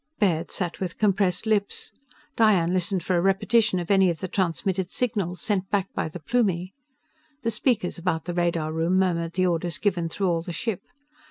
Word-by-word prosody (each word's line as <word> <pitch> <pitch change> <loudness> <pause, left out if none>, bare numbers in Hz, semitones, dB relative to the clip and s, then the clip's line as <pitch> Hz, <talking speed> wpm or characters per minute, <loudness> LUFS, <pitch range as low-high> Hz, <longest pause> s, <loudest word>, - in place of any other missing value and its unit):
Baird 170 -6 +1
sat 175 -3 -3
with 180 -3 -4
compressed 195 -2 +1
lips. 210 -2 0 0.4
Diane 190 -6 +4
listened 185 0 0
for 185 - 0
a 170 - +3
repetition 210 +2 +2
of 175 +2 -2
any 190 -2 +5
of 170 - -1
the 185 - -3
transmitted 185 0 -1
signals, 200 -8 -2
sent 195 -3 -1
back 200 -2 -1
by - - -2
the 180 - -8
Plumie. 190 -3 0 0.7
The 230 - +1
speakers 215 -5 0
about 165 -2 -1
the 175 - -3
radar 170 -3 0
room 165 +3 +1
murmured 170 -3 +1
the 185 0 +2
orders 170 -2 -1
given 175 -4 0
through 195 +3 -1
all 165 -1 +1
the 170 +1 -6
ship. 205 +3 -3
185 Hz, 185 wpm, -25 LUFS, 170-200 Hz, 0.7 s, any